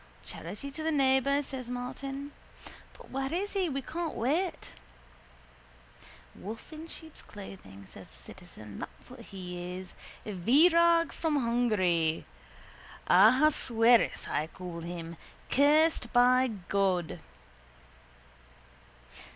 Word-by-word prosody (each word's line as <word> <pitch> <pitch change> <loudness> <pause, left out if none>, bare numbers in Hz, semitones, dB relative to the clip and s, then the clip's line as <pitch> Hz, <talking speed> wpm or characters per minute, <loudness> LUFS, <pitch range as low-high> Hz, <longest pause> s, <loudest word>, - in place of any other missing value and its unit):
—Charity 205 +11 -7
to 315 - -6
the 320 +1 0
neighbour, 275 0 +3
says 260 -3 -7
Martin. 270 +3 -5 0.7
But - - -15
where 270 +1 -2
is 385 +5 -2
he? 380 -4 0
We 275 -1 -3
can't 335 +2 -4
wait. 325 +10 -1 1.6
—A - - -16
wolf 220 - -8
in 315 +1 -8
sheep's 320 -1 -8
clothing, 100 - -11
says - - -13
the - - -19
citizen. 100 - -11
That's - - -10
what 255 - -11
he 180 -4 -7
is. 185 0 -10 0.3
Virag 330 - +4
from 320 -2 -1
Hungary! 215 - +1 0.8
Ahasuerus 235 +2 +4
I 155 - -1
call 175 0 -8
him. 170 0 -7 0.3
Cursed 295 -2 +3
by 255 +1 +5
God. 190 -5 -1
245 Hz, 110 wpm, -30 LUFS, 185-290 Hz, 1.6 s, by